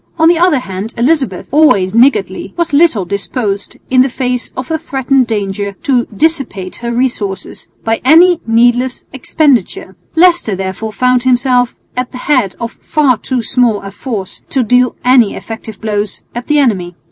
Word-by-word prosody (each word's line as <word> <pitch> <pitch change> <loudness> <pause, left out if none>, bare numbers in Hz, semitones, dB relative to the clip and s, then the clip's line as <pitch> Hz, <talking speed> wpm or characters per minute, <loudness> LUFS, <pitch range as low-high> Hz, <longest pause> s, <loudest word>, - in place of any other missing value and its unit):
On 320 -1 +4
the 335 -1 +4
other 350 -4 +3
hand 200 -2 -6
Elizabeth, 250 - 0
always 210 -11 +3
niggardly, 215 -6 +1
was 340 -3 -1
little 285 - +3
disposed 200 +2 -3
in 260 +1 +4
face 250 -1 -3
of 255 0 -4
the 320 -1 -1
threatened 270 -4 0
danger 200 -2 -3
to 260 -6 +1
dissipate 235 - -2
her 235 0 -4
resources 225 -6 -3 0.2
by 225 0 -1
any 335 +6 +5
needless 245 +2 +2
expenditure. 265 - 0 0.2
Leicester 340 - +3
therefore 190 +3 -4
found 250 +3 +1
himself 250 -1 +1 0.2
at 250 0 -3
the - - -8
head 255 -7 0
of 235 - -4
far 290 -5 +2
too 245 +2 -3
small 240 -4 +1
a 195 - -8
force 205 -3 -6
to 265 - +1
deal 250 +2 +2
any 250 -4 +4
effective 220 -2 -8
blows 210 -2 -3
at 240 +1 -6
the 300 - +2
enemy. 190 -11 0
245 Hz, 160 wpm, -13 LUFS, 205-270 Hz, 0.2 s, any